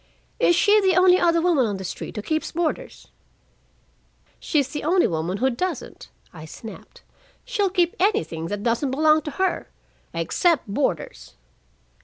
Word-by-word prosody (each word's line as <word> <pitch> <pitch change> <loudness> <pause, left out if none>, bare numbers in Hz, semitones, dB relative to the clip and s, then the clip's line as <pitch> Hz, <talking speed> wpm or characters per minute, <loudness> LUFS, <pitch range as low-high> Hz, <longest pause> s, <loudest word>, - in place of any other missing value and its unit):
"Is 345 - +4
she 415 +4 +4
the 380 -3 +3
only 365 0 +5
other 335 -1 +3
woman 315 -9 +3
on 205 -2 -3
the 190 - -7
street 190 - -6
who 210 - -5
keeps 315 +4 -2
boarders?" 345 +9 -3 1.3
"She's 285 -5 0
the 295 - -5
only 350 +4 +3
woman 170 +3 -2
who 260 +5 +1
doesn't," 360 +9 -5 0.2
I 160 -2 -10
snapped. 220 +7 -12 0.4
"She'll 425 -6 0
keep 355 -2 +1
anything 165 - 0
that 205 +2 -4
doesn't 235 +4 0
belong 310 +3 +3
to 300 - -6
her 380 0 -1 0.4
except 335 - +1
boarders." 200 - -3
310 Hz, 150 wpm, -23 LUFS, -, 1.3 s, only